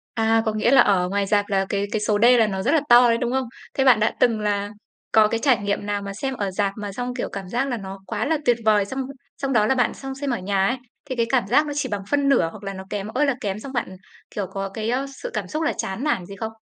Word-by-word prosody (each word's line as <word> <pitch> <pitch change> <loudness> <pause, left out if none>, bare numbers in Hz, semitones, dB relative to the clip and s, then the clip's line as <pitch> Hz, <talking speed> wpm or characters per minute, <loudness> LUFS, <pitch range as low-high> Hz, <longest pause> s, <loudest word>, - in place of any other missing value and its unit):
À, 225 0 +3
có 220 - 0
nghĩa 215 +4 +1
là 270 -3 +8
ở 180 -3 +2
ngoài 200 0 0
rạp 205 +1 +2
là 195 -1 +1
cái 200 0 0
cái 215 - 0
số 210 0 +1
D - - +6
là 220 - +4
nó 190 -2 -3
rất 250 +9 +1
là 325 - +4
to 240 0 +8
đấy, 230 - +3
đúng 240 0 -2
không? 265 -1 0 0.3
Thế 270 - +1
bạn 250 -5 +6
đã 215 - +1
từng 235 -4 +3
là 205 -1 -1 0.4
có 215 -1 +6
cái 225 +1 -1
trải 265 -1 +3
nghiệm 205 -1 -2
nào 205 0 -2
mà 200 0 -6
xem 265 +6 -3
ở 200 -5 -3
rạp 200 +1 0
mà 205 -1 -5
xong, 245 +4 -4
kiểu, 245 - -3
cảm 195 -2 -7
giác 245 +5 0
là 245 -3 -2
nó 195 -1 -8
quá - - -2
là 320 +2 +1
tuyệt 240 -1 +4
vời, 210 -2 +4
xong 265 +6 -5 0.4
xong 275 -1 -2
đó 215 -3 +4
là 265 - +2
bạn 245 - +1
sang 270 -1 -7
xem 280 +1 -4
ở 240 - 0
nhà 195 +1 0
ấy, 250 +5 0 0.3
thì 260 - -4
cái 235 -1 +1
cảm 245 -6 +1
giác 280 +7 +4
nó 295 - -3
chỉ 280 -3 -1
bằng 205 -2 -3
phân 285 -1 +2
nửa 240 -12 +3
hoặc 205 +1 -12
là 195 - -4
nó 190 0 -7
kém 205 -1 -4
ơi 260 +7 +1
là 275 -3 +1
kém 200 0 -3
xong 270 +4 -9
bạn, 235 -7 -3 0.4
kiểu, 200 -3 -2
có 195 +1 -4
cái, 220 +2 -4
ơ, 260 +3 0 0.2
sự - - -3
cảm - - -3
xúc 310 +1 -3
là - - +1
chán 190 +7 -4
nản 190 -12 0
gì 200 - -9
không? 220 +2 -5
220 Hz, 305 wpm, -23 LUFS, 200-255 Hz, 0.4 s, là